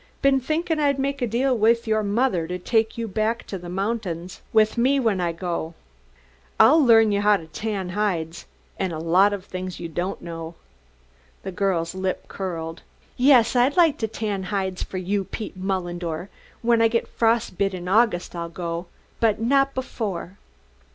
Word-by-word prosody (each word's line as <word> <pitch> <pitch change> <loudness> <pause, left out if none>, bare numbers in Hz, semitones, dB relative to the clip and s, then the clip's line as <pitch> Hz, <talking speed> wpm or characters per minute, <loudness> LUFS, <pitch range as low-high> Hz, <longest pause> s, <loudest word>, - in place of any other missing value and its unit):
Been 275 -1 +4
thinkin' 315 +4 -1
I'd 285 -2 +2
make 275 0 -2
a 245 - +1
deal 250 +4 +1
with 230 +1 +3
your 215 -1 +1
mother 205 -5 0
to 180 +1 -3
take 225 +5 0
you 230 -1 -3
back 220 +3 -1
to 195 - -6
the 175 0 -9
mountings 185 -3 -3
with 215 -1 +3
me 260 +4 +3
when 220 -7 +1
I 170 -1 0
go. 170 -1 -4 0.8
I'll 295 +8 +7
learn 225 -3 +6
you 200 0 +1
how 205 0 +4
to 165 - -10
tan 195 +2 -4
hides, 175 -4 -2 0.3
and 190 -2 -1
a - - -4
lot 180 +5 +4
of 200 -2 -5
things 185 -1 -6
you 170 - -5
don't 175 +4 -3
know." 165 -1 -7 0.9
The 190 - -4
girl's 180 -4 -1
lip 185 0 -3
curled. 165 -4 -5 0.3
"Yes, 255 -2 +5
I'd 255 +5 +3
like 330 -5 +4
to 220 - 0
tan 210 -3 -3
hides 190 -2 -2
for 190 - -5
you, 195 +2 -1
Pete 215 0 -6
Mullendore! 175 -2 -3 0.3
When 230 -1 +3
I 225 - +6
get 230 +1 -1
frost 230 -4 0
bit 195 -1 +1
in 180 -1 -7
August 195 -3 +2
I'll 170 0 -4
go, 170 0 -5 0.3
but 220 -3 +2
not 275 +4 +2
before." 205 -8 -4
200 Hz, 180 wpm, -24 LUFS, 180-230 Hz, 0.9 s, I'll